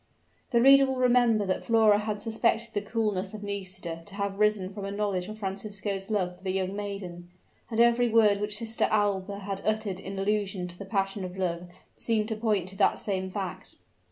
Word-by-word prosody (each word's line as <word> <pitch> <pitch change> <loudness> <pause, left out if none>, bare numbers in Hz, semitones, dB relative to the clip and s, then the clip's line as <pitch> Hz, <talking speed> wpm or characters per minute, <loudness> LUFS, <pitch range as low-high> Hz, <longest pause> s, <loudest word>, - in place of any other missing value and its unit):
The 235 - +3
reader 275 0 +8
will 265 0 -2
remember 240 -4 +4
that 185 - -1
Flora 220 -3 +4
had 210 -1 -3
suspected 225 0 0
the 205 - 0
coolness 210 -2 -2
of 210 - -8
Nisida 185 -4 -5
to 200 - -9
have 200 -1 -3
risen 210 -3 +2
from 205 0 -6
a 195 - -3
knowledge 200 -3 -1
of 215 - -7
Francisco's 195 0 -4
love 185 -4 -1
for - - -23
the 190 - -1
young 190 0 -1
maiden; 195 -4 -6 0.4
and 225 -1 -2
every 235 +1 +4
word 210 -3 +4
which 210 0 0
Sister 225 +1 0
Alba 200 -2 0
had 195 0 -4
uttered 215 -3 -1
in 195 0 -7
allusion 195 -2 -1
to 175 - -9
the 200 - -6
passion 195 0 -1
of 180 0 -6
love 175 -1 -2 0.3
seemed 220 -1 0
to 220 - -1
point 210 -5 0
to 190 - -9
that 200 - +3
same 190 -2 -2
fact. 190 -1 -6
205 Hz, 200 wpm, -28 LUFS, 190-215 Hz, 0.4 s, reader